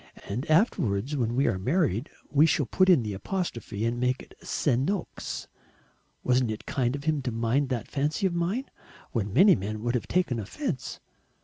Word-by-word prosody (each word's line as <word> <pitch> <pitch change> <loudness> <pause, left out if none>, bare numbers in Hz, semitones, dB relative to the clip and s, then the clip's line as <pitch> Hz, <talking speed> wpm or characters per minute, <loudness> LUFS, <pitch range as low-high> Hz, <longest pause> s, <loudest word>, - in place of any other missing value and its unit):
And 120 +10 -4
afterwards, 140 - +2
when 120 -3 0
we 135 +2 +3
are 95 - +1
married, 130 - +1 0.2
we 150 +2 +5
shall 150 -3 +2
put 185 +8 +3
in 170 -10 +6
the 105 -2 -3
apostrophe 115 - -3
and 120 +1 -1
make 125 +1 0
it - - -17
Se'noks. 145 +8 -1 0.8
Wasn't 125 -1 +2
it 110 0 -5
kind 125 -1 0
of 140 - -6
him 155 -2 +1
to 130 - -2
mind 115 +5 +1
that 120 -5 -2
fancy 150 +6 -1
of 185 - +1
mine, 180 +10 -1 0.5
when 105 -4 -1
many 190 - +7
men 105 +3 -4
would 120 0 0
have 125 - -1
taken 170 -10 +1
offence? 130 - -4
130 Hz, 180 wpm, -27 LUFS, 115-160 Hz, 0.8 s, many